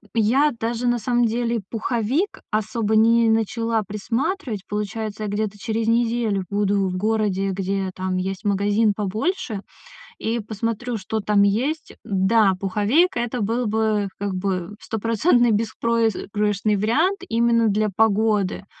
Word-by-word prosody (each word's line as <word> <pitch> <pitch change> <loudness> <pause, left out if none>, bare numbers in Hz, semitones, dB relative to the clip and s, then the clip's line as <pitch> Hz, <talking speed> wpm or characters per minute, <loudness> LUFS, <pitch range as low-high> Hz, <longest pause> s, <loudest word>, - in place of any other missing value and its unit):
Я 260 +7 +3
даже 235 +2 -1
на 240 - +2
самом 240 +2 +1
деле 235 0 0
пуховик 240 - -1
особо 220 0 0
не 230 +1 +5
начала 225 0 0
присматривать. 230 - -2
Получается, 210 +1 -4
я 210 - -2
где-то 205 0 -2
через 225 +1 -2
неделю 230 -4 +1
буду 200 -1 +1
в 185 - -3
городе, 200 -2 0
где 195 0 -2
там 185 0 -2
есть 190 +1 -3
магазин 205 +1 +2
побольше, 215 - -2 0.6
и 230 +2 -1
посмотрю, 230 +3 -3
что 215 +2 -3
там 210 -1 +2
есть. 260 +11 0
Да, 195 +1 +3
пуховейка 215 - +2
это 240 0 -2
был 230 +3 0
бы, 215 -1 +1
как 200 -1 -3
бы, 185 0 -3
стопроцентный 230 - +2
беспроигрышный 215 -2 0
вариант 315 - +1
именно 230 -2 +2
для 210 +1 +1
погоды. 210 -3 +2
220 Hz, 130 wpm, -22 LUFS, 205-230 Hz, 0.6 s, не